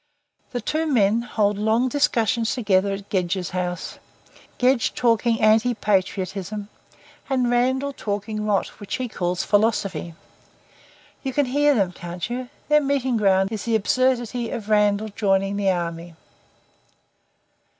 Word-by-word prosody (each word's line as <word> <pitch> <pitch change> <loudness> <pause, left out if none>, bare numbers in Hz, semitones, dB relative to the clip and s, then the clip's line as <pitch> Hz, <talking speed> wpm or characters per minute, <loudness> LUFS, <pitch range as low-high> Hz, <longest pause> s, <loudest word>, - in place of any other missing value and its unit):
The 245 - -4
two 315 +8 -1
men 225 -5 +3
hold 210 -3 0
long 220 +4 +2
discussions 235 -4 +1
together 200 -5 +2
at 195 0 -7
Gedge's 180 -1 -1
house, 180 -1 -4 0.6
Gedge 250 -1 +2
talking 230 -1 +2
anti 225 +3 +3
patriotism 200 0 -2 0.6
and 255 -3 +1
Randall 260 +3 +1
talking 210 -1 -4
rot 205 -2 +2
which 205 - -4
he 255 - -3
calls 180 -3 -2
philosophy. 200 -6 0 1.1
You 265 -2 -4
can 290 +2 +2
hear 290 +3 +3
them, 195 -5 +1
can't 175 +3 -6
you? 250 0 -4 0.2
Their 300 0 +4
meeting 270 -3 0
ground 195 -1 +2
is 215 -2 -4
the 230 -1 +1
absurdity 245 +1 +1
of 215 -2 -6
Randall 210 0 +2
joining 195 -1 0
the 200 -1 +1
army." 170 -2 -3
215 Hz, 130 wpm, -23 LUFS, 195-245 Hz, 1.1 s, Their